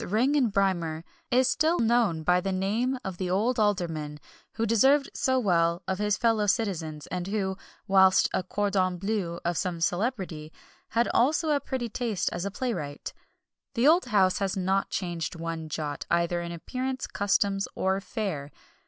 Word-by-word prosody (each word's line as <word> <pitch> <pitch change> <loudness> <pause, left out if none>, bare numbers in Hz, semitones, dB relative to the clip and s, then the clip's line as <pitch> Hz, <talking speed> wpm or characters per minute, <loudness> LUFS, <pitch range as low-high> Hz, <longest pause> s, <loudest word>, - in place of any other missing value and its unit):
Ring 245 +9 +2
and 255 -7 +2
Brymer, 175 -5 0 0.3
is 255 +1 +3
still 320 +5 +2
known 225 -8 +2
by 180 +2 +3
the 195 - -2
name 215 +8 0
of 190 -2 -4
the 185 -1 -2
old 225 +7 +1
Alderman 165 -8 -1 0.3
who 225 - -1
deserved 270 +6 +3
so 260 0 +1
well 170 -6 +2
of 190 0 -2
his 210 -1 +1
fellow 225 -3 +2
citizens, 165 -9 -1
and 180 0 -3
who, 195 -2 -1 0.3
whilst 190 -1 +5
a - - +1
cordon 185 -1 0
bleu 190 -3 -2
of 175 -1 0
some 180 -3 -2
celebrity, 175 -4 -2 0.4
had 235 +1 +1
also 300 +6 +2
a 290 - +3
pretty 260 -3 -3
taste 225 -3 -2
as 175 +2 -3
a - - -1
playwright. 185 - -4 0.6
The 240 +3 +3
old 340 +4 +5
house 195 -6 +2
has 195 0 -1
not 190 +1 0
changed 170 -5 -3
one 165 -1 -5
jot, 150 -1 -4
either 170 0 +1
in 170 0 -5
appearance, 255 +10 -4
customs, 195 0 0
or 190 +1 0
fare. 185 -8 -4
195 Hz, 165 wpm, -27 LUFS, 175-230 Hz, 0.6 s, whilst